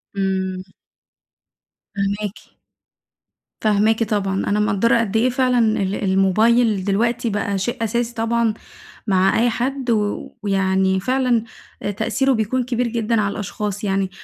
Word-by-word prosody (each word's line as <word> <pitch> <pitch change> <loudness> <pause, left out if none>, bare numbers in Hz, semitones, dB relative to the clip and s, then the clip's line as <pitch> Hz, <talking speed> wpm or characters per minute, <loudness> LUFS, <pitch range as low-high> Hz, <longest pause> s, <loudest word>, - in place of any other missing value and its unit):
امم. 190 -1 -1 1.3
فاهماكِ. 205 +1 -3 1.1
فاهماكِ 215 +1 +2
طبعًا، 200 -3 -1
أنا 205 +1 +1
مقدرة 220 +2 +2
قد 225 -1 0
إيه 240 +3 +3
فعلًا 250 0 +1
ال 210 -4 +1
الموبايل 205 +3 +3
دلوقتي 230 +4 0
بقى 205 -1 -1
شيء 235 +5 -2
أساسي 235 +2 -1
طبعًا 230 0 +1 0.5
مع 190 0 +3
أي 240 +1 +3
حد، 260 +2 -2
و 210 -2 -1
ويعني 190 -1 +1
فعلًا 250 +1 +1 0.4
آآ 205 - -1
تأثيره 250 +6 0
بيكون 235 +3 0
كبير 245 0 -1
جدًا 230 -1 0
على 200 -1 0
الأشخاص 205 0 -4
يعني. 195 -1 0
215 Hz, 125 wpm, -20 LUFS, 195-235 Hz, 1.3 s, إيه